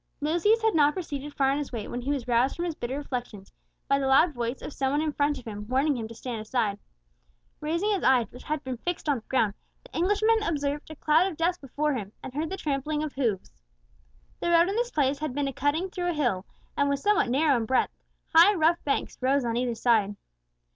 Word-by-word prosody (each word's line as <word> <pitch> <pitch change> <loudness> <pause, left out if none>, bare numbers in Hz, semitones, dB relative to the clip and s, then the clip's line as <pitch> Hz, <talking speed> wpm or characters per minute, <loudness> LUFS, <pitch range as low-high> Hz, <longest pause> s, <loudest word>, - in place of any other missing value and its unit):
Lucius 345 +10 +2
had 445 -1 +3
not 295 -2 +4
proceeded 295 -5 -5
far 270 -2 +2
on 280 - 0
his 290 - -5
way, 225 -4 -5
when 245 - -4
he 260 - -4
was 275 -4 -1
roused 245 +2 +2
from 345 - -3
his 340 - -2
bitter 260 -1 -4
reflections 245 -8 -6 0.3
by 275 - +3
the 270 - 0
loud 295 +5 +5
voice 240 0 -3
of - - -6
some 265 -1 0
one 290 - +2
in 310 0 0
front 290 0 +1
of 255 - -11
him 210 -2 -7
warning 270 +4 +2
him 225 -3 -4
to 230 - -11
stand 230 -1 -5
aside. 215 -2 -1 0.8
Raising 335 +7 0
his 400 - 0
eyes, 255 -3 +4
which 250 - -11
had 305 -1 -3
been 260 -2 -4
fixed 350 +5 -4
on 290 -2 +2
the 225 - -10
ground, 225 -6 +2 0.3
the - - -16
Englishman 420 +5 +2
observed 295 -6 -2
a 315 - -8
cloud 310 +5 +3
of 315 - -10
dust 350 +2 0
before 295 +2 -1
him, 210 -5 -5
and 255 - -7
heard 305 +3 -2
the 385 - -4
trampling 300 0 -2
of 305 - -4
hoofs. 225 -8 -2 0.9
The - - -1
road 340 +1 +5
in 400 - -2
this 480 +1 0
place 280 - +1
had 305 -4 -3
been 285 -1 0
a 275 - -3
cutting 310 +8 0
through 355 -1 -2
a - - 0
hill, 240 - 0 0.3
and 285 0 +2
was 280 0 -1
somewhat 415 -11 +3
narrow 280 +3 +3
in 225 -1 -2
breadth; 260 - +1 0.4
high 345 +6 +7
rough 335 0 +2
banks 280 - -2
rose 265 +1 +2
on 230 -1 -1
either 240 -1 0
side. 220 -3 +2
285 Hz, 235 wpm, -27 LUFS, 250-320 Hz, 0.9 s, high